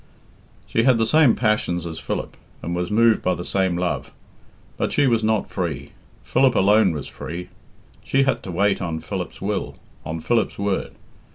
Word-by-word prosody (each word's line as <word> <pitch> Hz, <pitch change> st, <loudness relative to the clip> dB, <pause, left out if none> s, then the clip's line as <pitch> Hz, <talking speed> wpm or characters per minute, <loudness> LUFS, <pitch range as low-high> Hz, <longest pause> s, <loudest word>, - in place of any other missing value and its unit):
She 115 Hz, -, +1 dB
had 125 Hz, 0 st, +4 dB
the 115 Hz, -, +2 dB
same 150 Hz, 0 st, +5 dB
passions 105 Hz, -7 st, 0 dB
as 80 Hz, -1 st, -5 dB
Philip, -, -, -4 dB, 0.3 s
and 85 Hz, +1 st, -3 dB
was 90 Hz, 0 st, -2 dB
moved 115 Hz, +1 st, +4 dB
by 90 Hz, -, +1 dB
the 90 Hz, -, -6 dB
same 95 Hz, -3 st, 0 dB
love. 90 Hz, 0 st, -2 dB, 0.6 s
But -, -, -1 dB
she 145 Hz, -, +3 dB
was 115 Hz, -3 st, +2 dB
not 110 Hz, -1 st, 0 dB
free. 85 Hz, -8 st, -3 dB, 0.3 s
Philip 125 Hz, -, +3 dB
alone 100 Hz, 0 st, +4 dB
was 75 Hz, -3 st, -5 dB
free. 90 Hz, +3 st, -7 dB, 0.5 s
She 135 Hz, 0 st, +2 dB
had 135 Hz, -, 0 dB
to 95 Hz, -, -7 dB
wait 100 Hz, +3 st, +1 dB
on 85 Hz, -3 st, -3 dB
Philip's -, -, -6 dB
will, -, -, -3 dB, 0.3 s
on 80 Hz, +2 st, -4 dB
Philip's 115 Hz, +7 st, 0 dB
word. 100 Hz, -1 st, -2 dB
100 Hz, 175 wpm, -22 LUFS, 85-115 Hz, 0.6 s, same